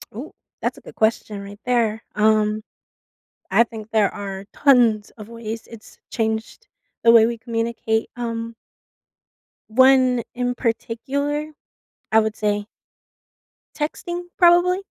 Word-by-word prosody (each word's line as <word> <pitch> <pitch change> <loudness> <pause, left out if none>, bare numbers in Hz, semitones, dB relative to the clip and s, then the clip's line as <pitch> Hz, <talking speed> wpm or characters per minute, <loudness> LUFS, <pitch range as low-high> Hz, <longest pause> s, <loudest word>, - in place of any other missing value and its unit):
Ooh, 270 +7 -7 0.3
that's - - -2
a - - -13
good - - -13
question 220 -2 0
right 200 +1 -10
there, 225 -3 +1
um, 215 0 +2 0.9
I 220 +5 +5
think 220 -1 -10
there 215 -3 +2
are 195 -1 -6
tons 235 -7 +3
of 215 -1 -10
ways 230 -1 -7
it's 225 -2 -13
changed 220 - -3 0.4
the 230 - +6
way 225 -1 +7
we 235 0 -3
communicate. 225 -1 -2
Um 230 -1 -4 1.2
one 255 0 +5
in 245 0 -1
particular, 280 +6 -2 0.6
I 220 - +6
would 220 0 -1
say 205 -1 -1 1.1
texting 345 +3 -3 0.2
probably? 350 +1 +5
230 Hz, 120 wpm, -22 LUFS, 215-250 Hz, 1.2 s, way